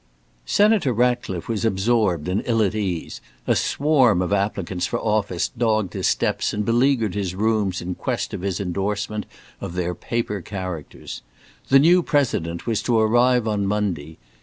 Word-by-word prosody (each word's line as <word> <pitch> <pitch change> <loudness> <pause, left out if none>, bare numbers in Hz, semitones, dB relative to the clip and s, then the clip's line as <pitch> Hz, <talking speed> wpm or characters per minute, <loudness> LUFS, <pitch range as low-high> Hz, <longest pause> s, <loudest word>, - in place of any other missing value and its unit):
Senator 205 - +3
Ratcliffe 120 -6 0
was 115 -2 -2
absorbed 100 -5 +1
and 95 +3 0
ill 115 -2 +3
at 100 - 0
ease. 95 -6 -3 0.2
A - - +2
swarm 135 - +3
of 90 - -1
applicants 95 -3 -1
for - - -2
office 105 -5 0
dogged 110 -5 0
his - - 0
steps - - 0
and 105 0 -2
beleaguered 115 -3 +2
his 95 -3 -3
rooms 105 -3 0
in 90 +1 -3
quest - - -3
of - - -4
his 95 -1 -2
endorsement 100 +3 -2 0.3
of 85 - -6
their 90 -1 -1
paper 105 +2 -3
characters. 90 -6 -7 0.5
The 135 - +7
new 170 +6 +5
President 100 - 0
was 115 -3 0
to 120 -2 +1
arrive 120 +2 +3
on 105 -2 0
Monday. 90 -7 -2
105 Hz, 160 wpm, -22 LUFS, 95-120 Hz, 0.5 s, The